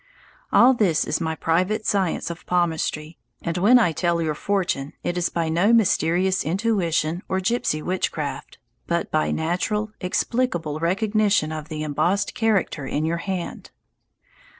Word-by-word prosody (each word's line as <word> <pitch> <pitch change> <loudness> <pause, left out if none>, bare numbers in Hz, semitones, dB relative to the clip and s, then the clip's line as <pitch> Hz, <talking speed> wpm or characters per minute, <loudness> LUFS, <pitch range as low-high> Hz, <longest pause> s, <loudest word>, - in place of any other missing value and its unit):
All 255 +2 +6
this 195 -10 +2
is - - -1
my 160 -1 -1
private 185 +7 0
science 190 -4 0
of 170 +1 -11
palmistry, 165 -2 -1 0.2
and 170 -1 -2
when 225 +7 +6
I 225 -8 +3
tell 170 +1 0
your 160 -2 0
fortune 175 -5 -2
it 175 - -2
is 175 -1 0
by 165 -1 -1
no 175 +7 +2
mysterious 190 -4 +2
intuition 175 -3 0
or 190 - 0
gipsy 185 -6 -1
witchcraft, 150 -6 -3 0.3
but 170 0 -1
by 155 - +1
natural, 195 +6 -1
explicable 180 -5 -1
recognition 200 -1 +1
of 155 0 -6
the 155 -1 -4
embossed 155 +7 0
character 200 - 0
in 150 +2 -1
your 165 +1 0
hand. 185 0 -5
175 Hz, 145 wpm, -23 LUFS, 160-200 Hz, 0.3 s, All